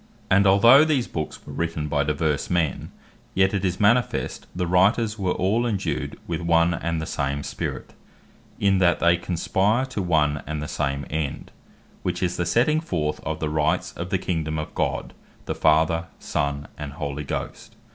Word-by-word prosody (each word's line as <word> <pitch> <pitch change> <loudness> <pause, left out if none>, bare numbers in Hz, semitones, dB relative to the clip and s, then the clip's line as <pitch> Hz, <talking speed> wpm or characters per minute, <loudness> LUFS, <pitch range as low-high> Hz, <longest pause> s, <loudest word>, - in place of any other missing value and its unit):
Their - - -29
Scope - - -25
And 100 - +4
although 115 +9 +7
these 150 -6 +1
Books 75 -2 -5
were - - -9
written 80 -2 -2
by 75 -1 +1
divers 75 0 -1
men, 85 -6 -1 0.4
yet 95 +1 +3
it 100 -2 -1
is 95 -1 -1
manifest 115 +3 +1
the 90 0 -1
Writers 105 +5 +2
were 95 -2 0
all 105 +6 +1
indued 95 - -2
with 85 0 -3
one 85 0 +3
and 85 -1 -2
the 80 - -3
same 70 -1 -2
Spirit, - - -5 0.7
in 100 -1 +3
that 90 -2 +3
they 85 0 +4
conspire 95 +7 0
to 130 -6 -4
one 75 -5 +1
and 75 0 -3
the 75 - -4
same 70 -2 -2
end, 75 -2 -3 0.5
which 90 0 -2
is 90 0 0
the 85 - -1
setting 130 - +3
forth 80 - -2
of 80 0 -4
the 75 - -1
Rights 75 0 0
of 90 +1 -6
the 95 - +1
Kingdome 80 -4 -2
of 75 - -5
God, - - -2 0.3
the - - -2
Father, 80 +1 +2
Son, 70 0 -2
and 75 -1 -6
Holy 75 0 -4
Ghost. 70 - -6
85 Hz, 185 wpm, -24 LUFS, 75-95 Hz, 0.7 s, although